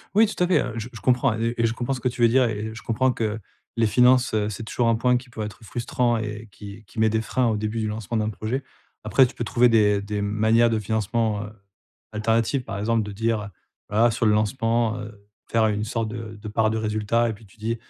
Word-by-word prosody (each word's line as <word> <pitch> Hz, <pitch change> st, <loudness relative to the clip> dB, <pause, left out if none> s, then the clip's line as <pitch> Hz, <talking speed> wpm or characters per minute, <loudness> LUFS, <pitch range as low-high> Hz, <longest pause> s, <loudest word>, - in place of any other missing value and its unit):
Oui, 220 Hz, +2 st, +7 dB
tout 205 Hz, -4 st, -1 dB
à -, -, +2 dB
fait, 185 Hz, -, +3 dB
heu, 125 Hz, -3 st, -5 dB
j 115 Hz, +2 st, -5 dB
je 115 Hz, -4 st, -11 dB
comprends 125 Hz, +2 st, +2 dB
e 115 Hz, +1 st, -1 dB
et 115 Hz, -, +1 dB
je 115 Hz, -, -2 dB
comprends 120 Hz, +3 st, -2 dB
ce 125 Hz, -, -4 dB
que 125 Hz, -, -1 dB
tu 120 Hz, -, -6 dB
veux 115 Hz, -, +7 dB
dire 125 Hz, +2 st, +4 dB
et 105 Hz, -1 st, -4 dB
et 110 Hz, +1 st, -5 dB
je 115 Hz, -, -9 dB
comprends 130 Hz, +3 st, +1 dB
que 110 Hz, -2 st, -2 dB, 0.4 s
les 115 Hz, -, +3 dB
finances, 125 Hz, +2 st, +4 dB
heu, 105 Hz, -1 st, +1 dB
c'est 110 Hz, +2 st, -6 dB
toujours 115 Hz, +2 st, -1 dB
un 115 Hz, -, +4 dB
point 125 Hz, +2 st, +2 dB
qui 125 Hz, 0 st, -9 dB
peut 110 Hz, -2 st, -5 dB
être 105 Hz, +2 st, -8 dB
frustrant 120 Hz, +1 st, -1 dB
et 105 Hz, 0 st, -5 dB
qui 100 Hz, +2 st, -11 dB
qui 110 Hz, -, -9 dB
met 110 Hz, 0 st, +4 dB
des 110 Hz, 0 st, 0 dB
freins 125 Hz, +2 st, 0 dB
au 110 Hz, -2 st, +1 dB
début 110 Hz, +2 st, -2 dB
du 110 Hz, -, -1 dB
lancement 110 Hz, +1 st, -3 dB
d'un 110 Hz, 0 st, 0 dB
projet. 115 Hz, +7 st, -3 dB, 0.4 s
Après, 130 Hz, -, +5 dB
tu -, -, -13 dB
peux 120 Hz, -, -3 dB
trouver 120 Hz, +2 st, +3 dB
des 105 Hz, -3 st, +3 dB
des 105 Hz, 0 st, -3 dB
manières 110 Hz, +3 st, +3 dB
de 110 Hz, -, +1 dB
financement, 110 Hz, 0 st, -1 dB
heu, 105 Hz, -, -8 dB, 0.6 s
alternatives, 115 Hz, +4 st, 0 dB
par 100 Hz, -4 st, -5 dB
exemple 110 Hz, +1 st, +1 dB
de 105 Hz, -, -6 dB
dire, 115 Hz, +2 st, 0 dB
heu, -, -, -7 dB, 0.4 s
voilà 115 Hz, +3 st, +4 dB
sur 115 Hz, -, -1 dB
le 105 Hz, -, +5 dB
lancement, 115 Hz, +1 st, +1 dB
heu, 105 Hz, -1 st, -10 dB, 0.2 s
faire 110 Hz, -1 st, +2 dB
une 105 Hz, 0 st, -1 dB
sorte 115 Hz, 0 st, -2 dB
de 110 Hz, -2 st, -7 dB
de 110 Hz, -, -7 dB
part 110 Hz, +1 st, +1 dB
de 110 Hz, -, -1 dB
résultat 110 Hz, +2 st, 0 dB
et 110 Hz, -, -2 dB
puis 105 Hz, +1 st, -15 dB
tu 95 Hz, -, -22 dB
dis: 115 Hz, +2 st, -2 dB
110 Hz, 260 wpm, -24 LUFS, 105-120 Hz, 0.6 s, Oui